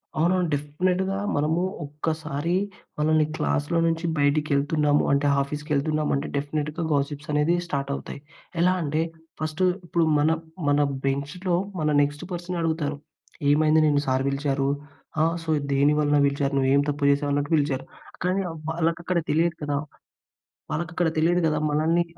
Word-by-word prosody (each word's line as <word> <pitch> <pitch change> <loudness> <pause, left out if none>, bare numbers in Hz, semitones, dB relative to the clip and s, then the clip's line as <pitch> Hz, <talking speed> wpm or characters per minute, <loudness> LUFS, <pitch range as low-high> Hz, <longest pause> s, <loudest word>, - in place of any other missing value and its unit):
అవునవును. 175 +3 +2
డెఫినిట్‌గా 180 +7 0 0.2
మనము 155 +4 +1 0.2
ఒక్కసారి 155 +2 -3 0.5
మనల్ని 155 0 +3
క్లాస్‌లో 145 +2 0
నుంచి 165 +1 -1
బయటికి 145 +1 +2
వెళ్తున్నామంటే, 145 0 +2
ఆఫీస్‌కి 150 +2 -5
వెళ్తున్నామంటే 150 0 0
డెఫినిట్‌గా 150 +3 -2
గాసిప్స్ 145 +2 -2
అనేది 150 +4 +3
స్టార్ట్ 140 -4 -2
అవుతాయి. - - -7 0.4
ఎలా 180 +1 +4
అంటే 155 0 0 0.4
ఫస్ట్ 155 +2 -3 0.2
ఇప్పుడు 170 -1 +1 0.2
మన, 150 +2 +3 0.4
మన 145 0 +3 0.3
బెంచ్‌లో 150 +7 -1 0.2
మన 155 -1 +1
నెక్స్ట్ 145 +2 -1
పర్సన్ 175 0 -4
అడుగుతారు. 160 -3 -1 0.5
"ఏమైంది 155 +1 +4
నిన్ను 145 -1 +3
సార్ 130 0 +1
పిలిచారు? 140 0 0 0.5
ఆ! - - +5 0.2
సో, 165 - -7 0.2
దేని 140 +2 +4
వలన 145 -1 +3
పిలిచారు? 140 0 0
నువ్వు 135 -1 +2
ఏం 140 - +5
తప్పు 145 0 -2
చేసావు? 145 +1 0
అన్నట్టు 145 +1 -1
పిలిచారు". 140 -3 0 0.4
కానీ 185 +2 +1 0.3
వాళ్ళకి 165 0 0
అక్కడ 180 -1 +1
తెలియదు 165 +2 +2
కదా! 145 -1 -1 1.0
వాళ్ళకి 165 0 -2
అక్కడ 175 -1 +2
తెలియదు 175 +2 +3
కదా! 150 -1 +1
మనల్ని 160 +3 +2
150 Hz, 140 wpm, -25 LUFS, 145-165 Hz, 1.0 s, ఆ